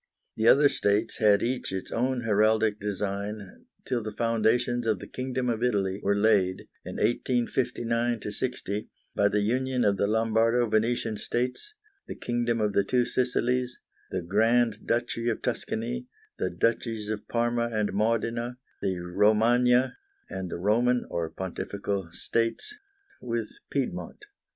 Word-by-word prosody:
The 110 +1 +1
other 145 +4 +7
states 105 -3 +1
had 105 -2 +4
each 125 +2 -1
its 95 -1 -5
own 125 +1 0
heraldic 110 -1 +2
design 100 0 -4 0.2
till 120 -2 -1
the 110 0 -5
foundations 115 +2 +1
of 110 -2 +2
the - - -9
Kingdom 130 0 -3
of 115 -2 -1
Italy 100 -5 +1
were 100 +1 +2
laid, 100 -3 +3 0.2
in - - -7
1859 120 0 0
60, 105 -2 -3 0.2
by 100 - +3
the 105 0 +1
union 125 +4 +1
of 100 -1 +3
the 100 - +1
Lombardo 115 +2 +2
Venetian 110 0 +1
States, 125 - -3 0.3
the - - -6
Kingdom 120 -1 -1
of 105 -1 +1
the 100 - +3
Two 125 +4 +2
Sicilies, 125 0 0 0.3
the 90 -2 -3
Grand 110 +4 +2
Duchy 120 0 0
of 115 - -3
Tuscany, 235 +2 -3 0.3
the - - 0
Duchies 115 -2 -1
of 110 -1 -4
Parma 120 0 0
and 105 -3 0
Modena, 115 +3 0 0.2
the 95 -1 -1
Romagna 120 +7 +3 0.3
and 95 -1 -4
the - - -4
Roman 120 +6 +2
(or 85 -1 -2
Pontifical) 95 +1 -4
States 115 - -1 0.5
with - - -3 0.2
Piedmont. 420 - -3
115 Hz, 140 wpm, -27 LUFS, 105-120 Hz, 0.5 s, other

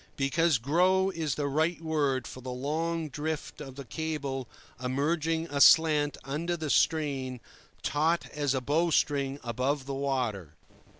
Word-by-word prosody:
Because 155 +2 +2
"grow" 180 +9 +2
is 160 -6 -2
the 145 - -2
right 155 +5 +1
word 145 -6 0
for 130 - -9
the 130 - -7
long 155 +6 -2
drift 150 +2 -4
of 135 -2 -9
a 140 - -6
cable 140 -4 -4 0.4
emerging 160 +5 0
aslant 145 +1 +5
under 165 +6 -2
the 155 -3 -2
strain, 135 -5 +1 0.4
taut 160 +3 +1
as 145 -2 0
a 130 - 0
bow 160 +6 +1
string 140 -3 +1
above 130 +4 -1
the 140 - -4
water. 125 - -2
145 Hz, 140 wpm, -29 LUFS, 135-160 Hz, 0.4 s, aslant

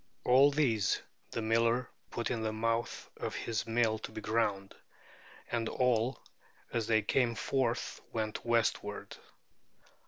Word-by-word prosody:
All 135 +3 +6
these 120 -9 +2 0.3
the 115 - -3
miller 115 +2 +2 0.2
put 120 - -2
into 115 -3 -1
the 110 - 0
mouth 115 +2 -1
of - - -4
his 110 -2 -2
mill 115 -1 +2
to - - -7
be 110 - -6
ground; 105 -3 0 0.8
and 115 -2 0
all 125 0 +1 0.5
as 115 -2 0
they 110 -1 +3
came 120 +2 +2
forth 120 +1 -1
went 110 -1 -2
westward. 115 -3 0
115 Hz, 130 wpm, -32 LUFS, 110-120 Hz, 0.8 s, All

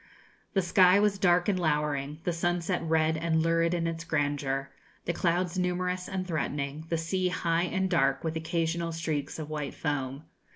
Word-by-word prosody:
The 195 -3 +2
sky 185 +2 +5
was 205 -1 +2
dark 175 -2 +3
and 195 -3 +1
lowering, 150 -2 -1
the 175 - 0
sunset 175 +1 0
red 160 -1 +2
and 160 0 +1
lurid 165 +1 +2
in 170 -1 -1
its 165 0 -3
grandeur, 145 -3 -1 0.3
the 175 - 0
clouds 175 +1 0
numerous 180 0 -1
and 190 -2 -2
threatening, 150 -2 -3
the 165 - +1
sea 180 +3 0
high 170 -1 +1
and 190 +1 0
dark, 140 -7 +2
with 160 -1 -2
occasional 165 +1 -1
streaks 160 -3 -3
of 155 -1 -6
white 150 -2 -4
foam. 140 -2 -3
165 Hz, 170 wpm, -29 LUFS, 155-180 Hz, 0.3 s, sky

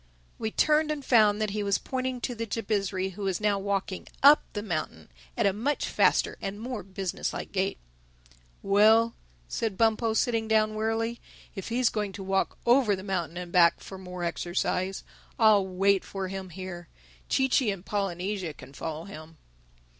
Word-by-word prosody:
We 220 - -1
turned 305 +6 +3
and 295 -3 -3
found 215 -4 +5
that 215 -2 -1
he 210 +1 -2
was 200 -1 +1
pointing 255 -1 -3
to 245 - -2
the 230 -1 -4
Jabizri, 200 -3 -1
who 195 +3 -10
was 190 -3 -1
now 210 -2 +1
walking 195 -1 -3 0.2
up 290 +2 +8
the 205 - -3
mountain 155 - -4 0.3
at - - +2
a 200 - +3
much 260 +9 -1
faster - - +2
and 195 +1 -4
more 240 -1 -4
business 190 -1 -4
like - - -6
gait. 195 0 -1 0.9
"Well," 220 +3 +5 0.3
said 215 - -2
Bumpo 225 0 +2
sitting 225 -1 +1
down 215 -1 +3
wearily; 225 +2 -1 0.3
"if 195 -1 -6
he 235 +2 -1
is 255 - +4
going 210 -2 -2
to 195 0 -7
walk 195 0 0
over 240 -4 +4
the 190 - -8
mountain 175 -4 -3
and 180 -1 -6
back, 170 -1 +5
for 190 - -9
more 180 -1 -7
exercise, 180 +2 -1 0.3
I'll 210 -4 +5
wait 195 +1 +2
for 190 -1 -5
him 190 -1 -6
here. 175 -1 -8 0.4
Chee 265 -1 +3
Chee 255 -2 +2
and 195 -2 -4
Polynesia 190 -3 -2
can 130 +2 -13
follow 160 +3 -5
him." 160 -4 -11
200 Hz, 175 wpm, -28 LUFS, 185-225 Hz, 0.9 s, up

